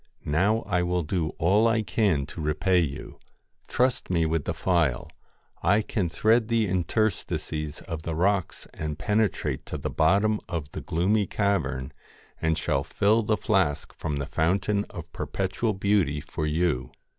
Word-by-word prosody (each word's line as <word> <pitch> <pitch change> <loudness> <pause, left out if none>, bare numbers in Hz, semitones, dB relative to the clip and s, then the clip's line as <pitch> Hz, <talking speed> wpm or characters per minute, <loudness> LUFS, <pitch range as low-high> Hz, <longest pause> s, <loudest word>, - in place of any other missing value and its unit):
Now 100 +10 +2
I 90 -3 +1
will 90 0 0
do 80 0 -1
all 100 +7 +4
I 115 -1 +2
can 100 -11 +1
to 80 - -8
repay 80 +5 +2
you. 70 -6 -4 0.5
Trust 125 0 0
me 85 -3 +2
with 80 -2 -1
the - - -1
phial. 80 -10 +1 0.5
I 100 +6 +3
can 95 -6 -1
thread 110 +5 +3
the 115 -2 +2
interstices 90 -5 -1
of 80 -4 -6
the 80 -1 -4
rocks 95 +1 0
and 75 -1 -4
penetrate 105 +3 0
to - - -4
the - - -4
bottom 100 +6 +3
of 75 -3 -4
the - - -6
gloomy 100 +5 +1
cavern, 70 -12 -1 0.5
and 80 0 +1
shall 70 -4 0
fill 105 +9 +2
the 110 0 +1
flask 95 - 0
from 75 - -3
the 70 -1 -2
fountain 95 +7 +1
of - - -9
Perpetual 100 +4 -1
Beauty 95 -7 +1
for 75 +1 -4
you.' 75 -5 0
90 Hz, 155 wpm, -26 LUFS, 75-105 Hz, 0.5 s, all